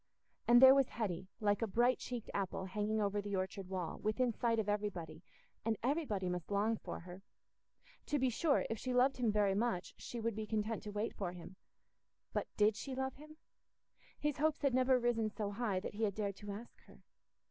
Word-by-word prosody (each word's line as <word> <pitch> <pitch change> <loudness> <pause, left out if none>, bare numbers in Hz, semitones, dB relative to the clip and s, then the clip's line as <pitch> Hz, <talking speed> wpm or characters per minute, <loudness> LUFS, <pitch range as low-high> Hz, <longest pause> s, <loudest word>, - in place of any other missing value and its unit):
And 240 0 +8
there 265 0 +11
was 275 -2 +3
Hetty, 190 -5 -3
like 205 0 +2
a 225 - +1
bright 240 +5 +3
cheeked 245 -3 -5
apple 190 -1 -2
hanging 210 +3 -1
over 205 0 +1
the 200 0 -3
orchard 190 0 -3
wall, 180 -4 -3
within 230 +3 +1
sight 230 +1 +1
of 220 -2 0
everybody, 185 -7 -2 0.4
and 225 -1 0
everybody 250 - 0
must 180 -1 -3
long 205 +3 +2
for - - -6
her! 180 +2 -10 0.9
To 295 - +1
be 260 -2 +2
sure, 290 +5 +2
if 225 - -3
she 255 -1 -2
loved 260 +2 +4
him 240 -4 +2
very 205 -2 +3
much, 205 -3 -1
she 240 - -6
would 230 -1 -1
be 215 0 -4
content 220 0 -1
to 210 - -4
wait 210 +2 -2
for 180 -3 -4
him: 180 +1 -10 0.8
but - - -1
did 210 0 +4
she 260 +6 -5
love 265 0 -2
him? 305 +2 -13 0.8
His 295 -1 -1
hopes 310 0 +1
had 275 -3 +3
never 255 0 +4
risen 235 -3 +1
so 205 -1 -3
high 205 -3 -1
that 190 - -6
he 210 - -6
had 205 -3 +1
dared 200 -2 -2
to 205 +1 -9
ask 220 +4 -9
her. - - -18
215 Hz, 205 wpm, -36 LUFS, 200-245 Hz, 0.9 s, there